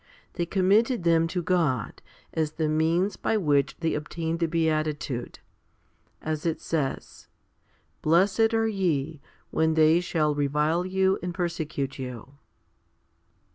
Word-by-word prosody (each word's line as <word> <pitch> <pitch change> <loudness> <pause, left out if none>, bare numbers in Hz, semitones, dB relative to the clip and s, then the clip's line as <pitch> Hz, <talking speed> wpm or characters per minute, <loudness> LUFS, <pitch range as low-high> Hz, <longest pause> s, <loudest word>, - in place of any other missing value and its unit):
They 170 -1 -2
com 185 0 0
mitted 225 +1 +3
them 165 -1 +3
to 175 +1 -3
God 160 -11 0 0.3
as 155 -1 -1
the 160 -1 -1
means 165 +6 +1
by 220 - 0
which 145 -7 +1
they 165 - 0
obtained 160 +2 -3
the 165 - +1
beatitude; 155 -5 -1 0.9
as 155 -1 -3
it 165 -2 -1
says, 150 -5 -3 0.7
Blessed 190 +7 +3
are 225 0 +2
ye, 160 -8 -1 0.3
when 160 0 +1
they 160 +1 +5
shall 160 -4 0
revile 150 +5 0
you, 190 0 +1
and 175 -1 -4
persecute 160 -7 -3
you. 125 0 -7
160 Hz, 130 wpm, -26 LUFS, 150-180 Hz, 0.9 s, they